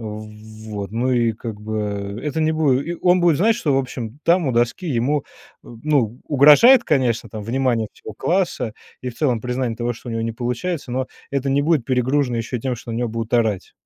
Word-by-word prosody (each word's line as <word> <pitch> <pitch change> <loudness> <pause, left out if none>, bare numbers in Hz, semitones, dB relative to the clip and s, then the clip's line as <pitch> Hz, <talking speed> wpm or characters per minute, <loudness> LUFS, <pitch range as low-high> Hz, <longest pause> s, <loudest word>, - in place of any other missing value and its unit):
Вот. 110 -1 -8
Ну 120 +3 0
и 120 -2 +2
как 110 -1 -7
бы, 105 -1 -4
это 150 +1 -2
не 155 0 +2
буде 155 0 +1
и - - -3
он 180 0 +5
будет 170 -4 +4
знать, 220 +5 +3
что, 150 - 0
в - - +3
общем, 125 -1 -5
там 170 -1 +3
у 130 - +1
доски 120 +9 0
ему, 140 +2 0 0.4
м, 115 -1 -12
ну, 130 -7 +1
угрожает 150 - +7
конечно 120 -5 +1
там 105 0 -7
внимание 120 -1 0
всего 110 - -10
класса, 170 - -1 0.3
и 125 - -4
в 120 - -9
целом 125 -7 +1
признание 125 -1 -2
того, 120 +1 -1
что 120 - -11
у 115 - -4
него 115 - -2
не 115 - -1
получается, 125 +5 -3
но 130 +1 -2 0.2
это 140 0 0
не 140 +1 +2
будет 155 -5 +2
перегружено 130 0 +1
ещё 115 +2 -3
и - - -11
тем 125 0 -2
что 115 0 -8
на - - -3
него 120 0 -1
будут 115 +1 -3
орать. 110 -5 0
125 Hz, 215 wpm, -21 LUFS, 115-145 Hz, 0.4 s, угрожает